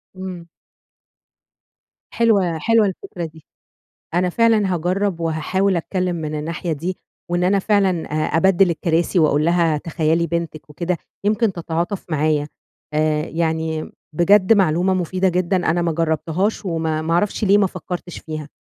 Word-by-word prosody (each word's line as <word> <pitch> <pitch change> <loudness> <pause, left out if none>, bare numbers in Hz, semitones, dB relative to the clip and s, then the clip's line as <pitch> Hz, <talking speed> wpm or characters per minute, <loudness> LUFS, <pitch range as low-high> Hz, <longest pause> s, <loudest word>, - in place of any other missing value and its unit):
إمم. 185 -2 -7 1.7
حلوة، 200 -8 +2
حلوة 225 +5 +3
الفكرة 190 - -5
دي. 160 -1 -13 0.7
أنا 180 +1 +2
فعلًا 215 -2 +2
هاجرّب 180 +1 -1
وهاحاول 170 +4 0
أتكلم 180 +1 -1
من 155 -1 -4
الناحية 165 +2 -3
دي، 175 +5 -4 0.3
وإن 175 +1 +1
أنا 195 +2 +3
فعلًا 200 -1 +2 0.4
آآ، - - +5
أبدِّل 190 +1 +4
الكراسي 170 +2 0
وأقول 150 -1 +3
لها 170 -2 +2
تخيلي 165 +1 0
بنتِك 165 -2 -4
وكده، 170 +3 -2 0.3
يمكن 215 0 +2
تتعاطف 170 +2 -3
معايا. 150 -1 +1 0.5
آآ، 155 0 +1
يعني 160 -1 -2 0.3
بجد 190 +3 +5
معلومة 185 -2 +3
مفيدة 185 +1 0
جدًا 180 +1 +1
أنا 175 +1 +1
ما 170 -1 0
جرّبتهاش 165 +6 -1
وما، 160 -3 -1
ما 165 +1 -2
أعرفش 205 +4 0
ليه 200 +1 +5
ما 200 - +4
فكّرتش 180 -1 -6
فيها. 155 -2 -7
175 Hz, 140 wpm, -20 LUFS, 160-190 Hz, 1.7 s, آآ